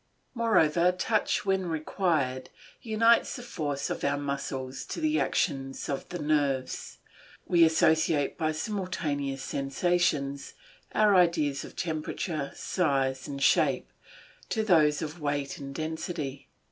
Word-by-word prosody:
Moreover, 180 -8 +3
touch, 210 +3 0
when 190 -2 +1
required, 155 -5 -1 0.3
unites 230 0 +3
the 245 - -7
force 150 - -3
of - - -4
our 140 0 +1
muscles 135 -2 -4
to - - -5
the 310 -1 +1
action 135 -4 0
of 140 - -4
the 175 - -4
nerves; 145 -4 -1 0.5
we 170 -2 +4
associate 160 -2 +3
by 155 -1 0
simultaneous 155 -7 -3
sensations 140 -1 0 0.4
our 215 -1 +5
ideas 165 -6 +3
of - - -11
temperature, 155 -2 -3
size, 135 -6 0
and 140 -1 -4
shape, - - +2 0.6
to 220 - 0
those 155 -8 +4
of 155 +2 -6
weight 145 -1 -2
and 140 -1 -7
density. 155 -3 -4
155 Hz, 120 wpm, -28 LUFS, 140-180 Hz, 0.6 s, our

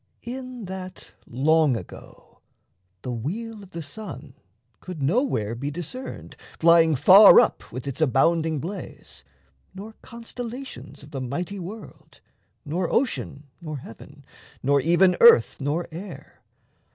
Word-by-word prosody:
In 255 -2 -7
that 185 -1 -9 0.2
long 145 +1 +2
ago - - -13 0.6
The 125 - -4
wheel 205 - -5
of 195 - -14
the 170 -3 -7
sun 145 - -8 0.5
could 180 -4 -9
nowhere 140 - 0
be 135 +5 -4
discerned 175 - -7 0.2
Flying 165 -1 +5
far 190 +9 +8
up - - 0
with 125 +1 -7
its 140 +3 -5
abounding 160 +3 +2
blaze, 170 - -8 0.5
Nor 210 +3 -9
constellations 240 - -9
of 145 - -14
the 135 -3 -5
mighty 175 +10 -4
world, 200 +5 -11 0.5
Nor 170 +4 -2
ocean, 230 - -1 0.2
nor 155 -3 -6
heaven, 140 +3 -13 0.4
nor 140 +1 +3
even 175 +4 +3
earth 470 0 +6
nor 150 +5 -2
air. 175 +3 -10
170 Hz, 125 wpm, -24 LUFS, 145-205 Hz, 0.6 s, far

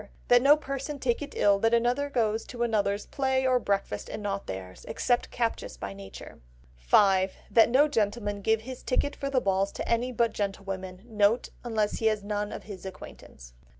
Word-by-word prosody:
That 245 0 +7
no 285 +3 +6
person 275 0 -5
take 250 -2 0
it 290 0 -7
ill 200 -1 +4
that 225 +2 +3
anyone 245 +5 +1
goes 225 -3 +1
to 240 -1 -3
another's 205 -3 0
play 265 -1 0
or 255 -1 +3
breakfast 200 - -2
and 215 - -6
not 200 -1 -3
theirs; 95 -1 -7
except 245 -1 0
captious 230 -2 -2
by 100 - -6
nature. 100 0 -11 0.5
5. 190 - +5 0.2
That 225 -1 +6
no 275 +5 +5
gentleman 205 -5 -1
give 220 +2 +2
his 255 +2 -8
ticket 285 +2 0
for 275 - -3
the 270 -2 +2
balls 195 -3 +1
to - - -5
any 235 +2 +1
but 235 -2 +1
gentlewomen. 195 -1 -4
N.B.—Unless 215 0 0
he 225 - +2
has 215 -2 0
none 205 0 -2
of - - -7
his 200 -4 -9
acquaintance. - - -11
220 Hz, 185 wpm, -28 LUFS, 200-250 Hz, 0.5 s, That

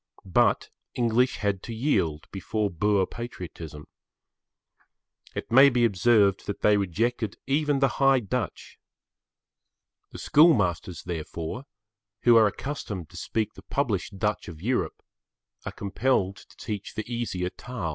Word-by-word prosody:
But 95 - +2 0.2
English 120 +1 +2
had 100 -3 -1
to 115 - -7
yield 95 - 0
before 105 +1 -2
Boer 100 +3 +2
patriotism. 85 -10 -8 1.5
It - - -5
may 135 +4 +8
be 120 -2 +2
observed 100 -1 +3
that 100 - -4
they 105 - +5
rejected 105 +3 -1
even 145 +1 +1
the 135 - +5
High 135 -1 +5
Dutch. 115 -2 -4 1.3
The - - -10
school 160 +2 +5
masters, 90 -4 -2
therefore, 85 - -5 0.6
who 120 -1 +6
are 110 -2 +7
accustomed 105 - -5
to - - -15
speak 110 -1 -2
the - - -13
published 105 -8 -2
Dutch 105 +1 -1
of 80 -3 -9
Europe, 125 +8 -2 0.6
are - - -3
compelled 100 -1 0
to - - -17
teach 105 -4 -6
the 110 - -3
easier 115 -7 -3
Taal. 115 -9 -5
105 Hz, 135 wpm, -26 LUFS, 95-120 Hz, 1.5 s, may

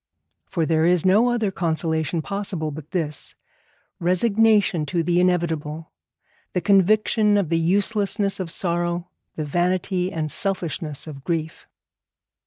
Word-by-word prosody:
For 165 -3 -1
there 160 0 +2
is 175 0 +3
no 210 +6 +5
other 225 -5 0
consolation 160 -2 -1
possible 195 -5 -3
but 150 +1 -9
this, 155 -6 -4 0.6
resignation 200 0 +3
to 170 +1 0
the 175 +1 +2
inevitable, 165 -3 -1 0.6
the 180 - +1
conviction 210 +3 +3
of 195 -6 0
the 165 -1 +2
uselessness 200 +3 +1
of 185 -3 -3
sorrow, 175 0 -2 0.3
the 155 - -3
vanity 180 +3 0
and 155 -2 -3
selfishness 165 -6 -3
of 140 -4 -9
grief. 160 -1 -3
175 Hz, 125 wpm, -23 LUFS, 160-195 Hz, 0.6 s, no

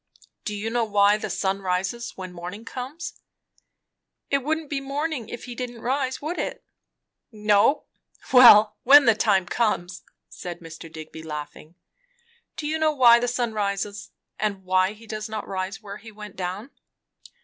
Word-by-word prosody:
"Do 210 - -3
you 215 +2 -3
know 240 0 +1
why 205 -1 +4
the - - -5
sun 195 0 -1
rises 195 +6 -2
when 185 -1 -7
morning 180 +6 -8
comes?" 290 +9 -7 1.1
"It 275 - +3
wouldn't 310 +3 -2
be 275 -2 -1
morning, 275 -3 -3
if 240 - -7
he 245 - -7
didn't 240 -1 -6
rise, 260 +1 -1
would 325 +4 -3
it?" - - -4 0.7
"No. 210 +4 +3 0.5
Well, 215 -4 +8
when 280 +2 +8
the 225 - +6
time 205 -4 +2
comes," 180 -4 -1 0.3
said 175 -1 -8
Mr. 165 -1 -11
Digby 160 0 -9
laughing. 150 +1 -8 0.8
"Do 300 - -5
you 315 +1 -1
know 315 -1 +3
why 240 -4 +7
the 245 - -1
sun 240 -2 -1
rises? 205 0 -3 0.3
and 200 -2 -2
why 185 +2 +2
does 215 0 -5
he - - -15
not 215 -1 -4
rise 195 +2 -4
where 200 0 -8
he 220 +1 -12
went 210 -1 -10
down?" 190 +8 -5
215 Hz, 160 wpm, -24 LUFS, 190-245 Hz, 1.1 s, Well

